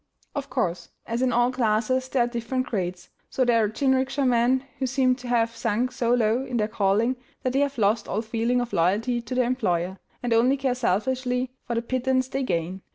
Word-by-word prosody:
Of 280 -1 -4
course, 180 -9 -2 0.2
as 235 +1 -2
in 260 -1 +2
all 240 +1 +3
classes 250 +1 +1
there 260 -2 +2
are - - 0
different 240 +2 -2
grades, 180 -6 -3 0.2
so 260 - +1
there 230 -2 +4
are 210 - +1
jinrikisha 265 +3 +1
men 250 +2 +3 0.2
who 265 - 0
seem 260 0 +2
to 250 -1 -9
have 230 -1 +1
sunk 230 +2 0
so 245 -2 -1
low 230 +2 +2
in 255 -3 -3
their 210 -2 +1
calling 215 +4 +1 0.3
that 255 - 0
they 270 - +2
have 280 -1 0
lost 215 +1 +2
all 215 +3 -2
feeling 235 +2 0
of 245 - -5
loyalty 215 +8 +1
to 235 +2 -5
their 250 -1 +3
employer, 190 -7 -1 0.2
and 240 -1 +1
only 250 +4 +4
care 265 -2 0
selfishly 250 +3 0 0.2
for 235 - -2
the 230 - -1
pittance 255 +1 0
they 270 - -2
gain. 180 -4 -2
240 Hz, 210 wpm, -25 LUFS, 220-255 Hz, 0.3 s, there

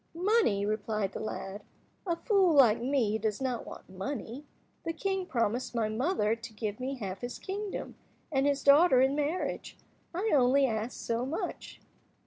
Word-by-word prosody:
"Money," 360 - +2
replied 215 -1 -1
the - - -5
lad, 205 -2 -5 0.5
"a 340 - +1
fool 380 -4 +3
like 235 -5 +6
me 240 -5 +1
does 215 -1 -1
not 255 -3 -2
want - - -10
money. 235 +7 -6 0.4
The 330 - -2
king 385 0 -2
promised 240 - -1
my 220 -2 +1
mother 225 - +1
to 230 -1 -10
give 210 0 -4
me 265 +2 -3
half 195 -6 -6
his 245 0 -5
kingdom, 400 +1 -5 0.4
and 270 -1 +2
his 280 -1 0
daughter 285 0 +6
in 265 +1 +3
marriage. 300 +4 -2 0.3
I 385 +6 -1
only 270 0 +5
ask 225 -1 -2
so 230 +1 -1
much!" 275 +6 -5
255 Hz, 160 wpm, -30 LUFS, 220-300 Hz, 0.5 s, like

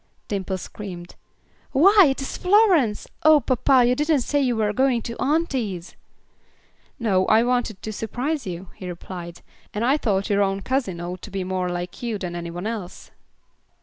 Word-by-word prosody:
Dimple 190 -2 -2
screamed, 180 -2 -8 0.6
"Why, 380 +6 +7
it 270 - -2
is - - -5
Florence. 365 - +3
Oh! 310 -2 +7
papa, 260 -1 +3
you 245 - +3
didn't 295 +1 +1
say 285 +4 0
you 250 -3 +1
were 210 -1 0
going 255 0 +2
to 235 - -5
auntie's!" 260 - -1 1.0
"No. 195 -5 +1
I 220 +1 +5
wanted 245 -5 -1
to 215 - -4
surprise 255 +6 -3
you," 180 +1 -6
he 185 - -8
replied. 175 -1 -8 0.3
"And 215 +3 0
I 270 +4 +3
thought 200 -8 0
your 200 0 +3
own 195 0 0
cousin 250 -10 -1
ought 180 +1 -6
to - - -9
be 195 -1 -3
more 185 -1 -2
like 175 0 -5
you 235 -3 -2
than 180 -3 -5
any 170 0 -5
one 175 +3 -6
else." 215 -5 -6
220 Hz, 175 wpm, -23 LUFS, 185-265 Hz, 1.0 s, Why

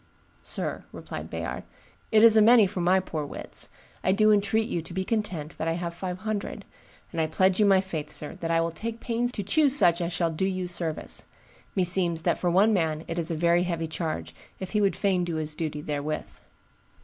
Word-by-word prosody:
"Sir," - - -4
replied - - -7
Bayard, - - -4 0.5
"it 220 -1 +5
is 230 -1 +8
a 220 - +7
many 225 0 +7
for 185 -1 -3
my 180 +2 +4
poor 160 -5 -4
wits; 145 - -5 0.3
I 185 - +3
do 215 +2 +4
entreat 210 +2 +2
you 170 - -2
to 165 - -10
be 190 - 0
content 185 -9 -3
that 160 - -2
I 165 - +1
have 170 0 -4
five 180 +1 -5
hundred; 215 +1 -4 0.5
and 165 - -1
I 160 - +1
pledge 185 +4 +2
you 210 - +5
my 195 -1 +5
faith, 160 -6 -5
sir, 150 - -4
that 165 - -3
I 165 0 +3
will 165 0 -1
take 225 +7 -6
pains 240 +1 -1
to 205 - -3
choose 280 +6 +4
such 175 -10 +5
as 170 0 -2
shall 170 -1 0
do 160 +4 -1
you 185 -1 -2
service; 170 -3 -3 0.5
meseems 180 -3 +3
that - - +1
for 180 - +1
one 200 +5 +4
man 160 -4 0
it 165 +1 -3
is 165 0 +3
a 165 - -1
very 170 +2 +3
heavy 170 -2 -2
charge, 155 - -4 0.3
if 190 - -6
he 210 - +1
would 200 -1 +2
fain 190 -3 +1
do 170 -2 -3
his 155 -1 -2
duty 150 -1 -4
therewith." 150 0 -3
180 Hz, 220 wpm, -26 LUFS, 165-200 Hz, 0.5 s, is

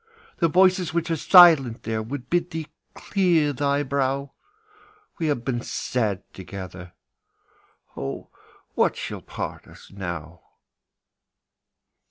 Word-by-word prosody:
The 170 - +3
voices 180 0 +3
which 170 0 -1
are - - +2
silent 160 - +6
there 110 -1 -2
Would 125 +3 -6
bid 175 +2 0
thee 160 -1 -5 0.3
clear 170 -7 +1
thy 140 +2 0
brow; 140 0 -1 0.9
We 165 - 0
have 140 -6 -1
been 120 -2 -1
sad 105 -6 -2
together. 90 -2 -9 1.0
Oh, 70 0 -6 0.4
what - - +2
shall - - -5
part - - -7
us - - -16
now? 85 -4 -7
140 Hz, 115 wpm, -24 LUFS, 110-165 Hz, 1.0 s, silent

